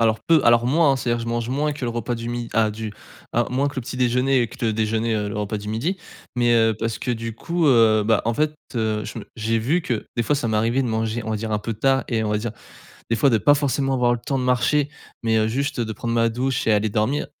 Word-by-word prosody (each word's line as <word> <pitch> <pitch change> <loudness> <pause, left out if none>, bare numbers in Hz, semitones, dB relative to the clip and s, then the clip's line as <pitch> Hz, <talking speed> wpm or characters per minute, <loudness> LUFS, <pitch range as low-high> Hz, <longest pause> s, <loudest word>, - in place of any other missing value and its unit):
alors 110 -1 +3
peu, 165 -2 +5
alors 120 0 +5
moins, 145 +2 +4
hein. - - +1
C'est-à-dire 120 -2 -1
je - - -5
mange 120 0 -2
moins 145 +3 0
que 140 -3 -5
le 120 - -1
repas 120 +1 -2
du 115 0 -5
mi 120 -1 -4
à 110 -1 +2
du 110 0 -6 0.4
à 120 0 +1
moins 135 +3 0
que 140 - -10
le - - 0
petit 125 +1 -7
déjeuner 125 +1 +2
et 115 - -2
que 125 0 -6
le 110 - +1
déjeuner, 110 +1 0
heu, 105 -1 -1
le 105 +1 -4
repas 105 +1 -2
du 105 0 -7
midi. 120 - -1 0.4
Mais 120 -1 +2
heu, 115 -1 +3
parce 115 0 -2
que 125 - -3
du 115 -1 -4
coup, 170 +6 -1
heu 115 -5 +5
bah, 110 0 +3
en 115 0 0
fait, 155 +2 0 0.2
heu, 110 -2 -1
je - - -6
me 100 - -10
j'ai 115 +1 0
vu 150 +11 +1
que 120 -7 -3
des 120 - +2
fois 145 - +2
ça 125 -5 -1
m'est 110 - +1
arrivé 115 +5 +1
de 125 - -2
manger 110 +1 -1
on 110 - -4
va 110 - 0
dire 110 +1 -4
un 105 - +1
peu 115 +1 -4
tard 135 +4 +2
et 110 -2 0
on 105 - -1
va 105 - +1
dire 115 +2 -3 0.6
des 115 - +2
fois 140 - +4
de 115 - +4
pas 145 +7 +5
forcément 140 -1 0
avoir 120 -1 +2
le - - -4
temps 140 -2 -1
de 130 - -2
marcher. 125 +4 +2 0.3
Mais 110 -1 +2
heu, 110 0 +2
juste 140 +2 -2
de 110 -1 -2
prendre 115 +2 -3
ma 115 0 +3
douche 130 +2 -1
et 110 - +4
aller 105 +1 +2
dormir 110 +7 0
115 Hz, 290 wpm, -22 LUFS, 110-130 Hz, 0.6 s, peu